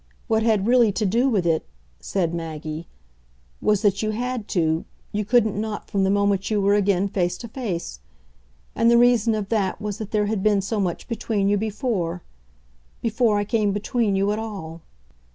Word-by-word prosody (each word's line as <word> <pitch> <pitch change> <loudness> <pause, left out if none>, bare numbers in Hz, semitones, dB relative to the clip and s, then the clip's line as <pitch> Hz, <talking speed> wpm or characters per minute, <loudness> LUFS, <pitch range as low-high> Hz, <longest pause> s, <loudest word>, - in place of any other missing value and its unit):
What 220 -2 +2
had 220 -3 +2
really 240 -2 +5
to 215 - -1
do 235 +7 +2
with 200 -8 +1
it," 165 -2 +2 0.4
said 175 -4 -1
Maggie, 160 -1 -5 0.7
"was 210 0 +2
that 200 -2 +2
you 215 - -1
had 240 0 -3
to: 160 -3 +1 0.3
you 210 +1 -1
couldn't 220 -1 +2
not, 215 -1 -5
from 195 -1 +1
the - - +2
moment 200 -1 +1
you 215 -2 +1
were 200 0 +3
again 200 -1 +2
face 180 -2 -1
to 235 - -8
face. 200 - -4 0.7
And 230 - +3
the 235 - +6
reason 240 -2 +4
of 205 -2 -3
that 205 -5 0
was 210 -1 -4
that 215 -2 -5
there 210 -1 +1
had 210 -1 -1
been 205 -1 +3
so 210 +3 -2
much 180 -4 -2
between 215 -3 -1
you 205 - +3
before 200 -5 -2 0.8
before 225 -1 +2
I 205 - +1
came 210 -2 +1
between 210 0 0
you 195 +1 +1
at 210 - -1
all." 190 -7 -7
205 Hz, 190 wpm, -23 LUFS, 190-220 Hz, 0.8 s, the